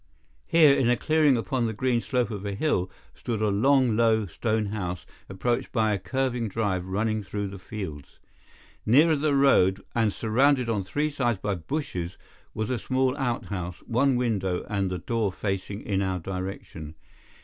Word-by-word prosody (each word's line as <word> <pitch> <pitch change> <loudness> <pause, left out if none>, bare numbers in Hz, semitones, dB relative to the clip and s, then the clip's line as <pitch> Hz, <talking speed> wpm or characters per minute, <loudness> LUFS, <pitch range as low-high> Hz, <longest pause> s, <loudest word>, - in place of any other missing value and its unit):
Here, 155 -4 +6
in 125 -3 +2
a 125 - +3
clearing 155 -3 +3
upon 120 +1 -1
the 110 - -3
green 120 +2 0
slope 125 -3 -1
of 100 -2 -5
a 100 -1 -3
hill, 100 - 0 0.2
stood 115 -3 -4
a 110 -1 +1
long, 125 +3 +3
low, 110 -1 +3
stone 110 +4 -1
house, 90 -5 -4 0.2
approached 110 +5 -1
by 110 -3 +2
a 100 - -1
curving 120 +4 -1
drive 100 -3 -1
running 110 +3 -1
through 100 0 -4
the 100 0 -9
fields. 90 -8 -7 0.7
Nearer 155 +8 +5
the 145 0 +1
road, 100 -9 +4
and 115 -3 +2
surrounded 125 +4 +2
on 105 -4 0
three 145 +11 -1
sides 120 -6 0
by 100 +2 -2
bushes, 90 - -4 0.4
was 110 +2 -2
a 125 - -1
small 130 0 0
outhouse, 100 -10 -3
one 130 +3 +2
window 100 -7 -1
and 100 -3 -1
the 90 - -3
door 110 +2 -1
facing 100 +1 -4
in 100 -2 0
our 95 -1 -1
direction. 90 -4 -6
110 Hz, 170 wpm, -26 LUFS, 95-125 Hz, 0.7 s, Here